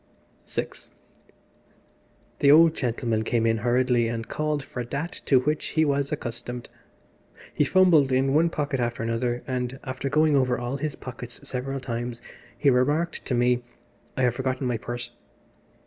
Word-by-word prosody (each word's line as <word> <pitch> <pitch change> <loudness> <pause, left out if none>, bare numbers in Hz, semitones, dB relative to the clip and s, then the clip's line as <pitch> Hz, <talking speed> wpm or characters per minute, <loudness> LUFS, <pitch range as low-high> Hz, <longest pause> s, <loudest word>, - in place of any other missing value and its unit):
VI - - -2 1.7
The 140 - +4
old 160 +2 +7
gentleman 115 -5 -1
came 115 0 +1
in 115 0 +2
hurriedly 120 +1 +2
and 115 0 -4
called 150 -2 -1
for 125 -2 -5
that 140 +8 -5
to 130 -3 +4
which 150 +3 -1
he 160 - +5
was 140 0 0
accustomed. 120 -3 -5 0.8
He - - +2
fumbled 165 -5 +5
in 135 +1 +2
one 165 +3 +4
pocket 145 -4 -2
after 120 -1 -1
another, 120 +1 -1
and 125 -1 -3
after 130 0 -4
going 155 +1 +3
over 130 -2 +2
all 120 +3 -3
his 150 0 -3
pockets 125 -1 -9
several 135 +2 -3
times 120 -1 -4 0.4
he 140 - +4
remarked 145 +7 +1
to 125 - -1
me 125 0 +2 0.6
"I 130 - +1
have 125 -2 +3
forgotten 130 +1 -2
my 120 -2 0
purse." 120 +1 -5
130 Hz, 155 wpm, -25 LUFS, 120-140 Hz, 1.7 s, old